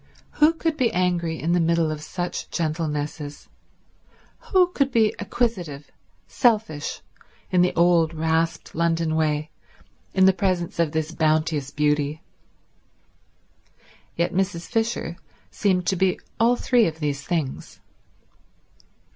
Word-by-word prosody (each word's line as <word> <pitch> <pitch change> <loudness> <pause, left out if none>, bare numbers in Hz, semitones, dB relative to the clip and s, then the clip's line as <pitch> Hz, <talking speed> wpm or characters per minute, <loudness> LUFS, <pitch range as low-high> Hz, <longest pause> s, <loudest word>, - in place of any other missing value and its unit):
Who 305 +2 +6
could 325 -1 -2
be 240 -3 +2
angry 175 -3 0
in 165 - -1
the 175 - +3
middle 165 -1 +2
of 155 -1 -5
such 175 +3 -4
gentlenesses? 150 -3 -3 1.0
Who 365 -2 +5
could 275 -6 0
be 220 -3 +3
acquisitive, 185 - -2 0.4
selfish, 215 - 0 0.5
in 180 -1 +4
the 180 - +2
old 170 -2 +4
rasped 160 +1 -1
London 165 -1 0
way, 155 -1 0 0.6
in 190 -1 +5
the 190 - +6
presence 185 -3 -1
of 165 -3 +2
this 160 0 -2
bounteous 155 -3 +1
beauty? 150 +1 0 1.9
Yet 170 +1 0
Mrs. 185 -2 -1
Fisher 225 -7 -2 0.3
seemed 185 -3 +1
to 190 - +1
be 185 0 +1 0.2
all 235 +2 +4
three 245 -1 +3
of 160 -1 -5
these 145 -2 -2
things. 160 -6 -3
170 Hz, 120 wpm, -24 LUFS, 155-190 Hz, 1.9 s, Who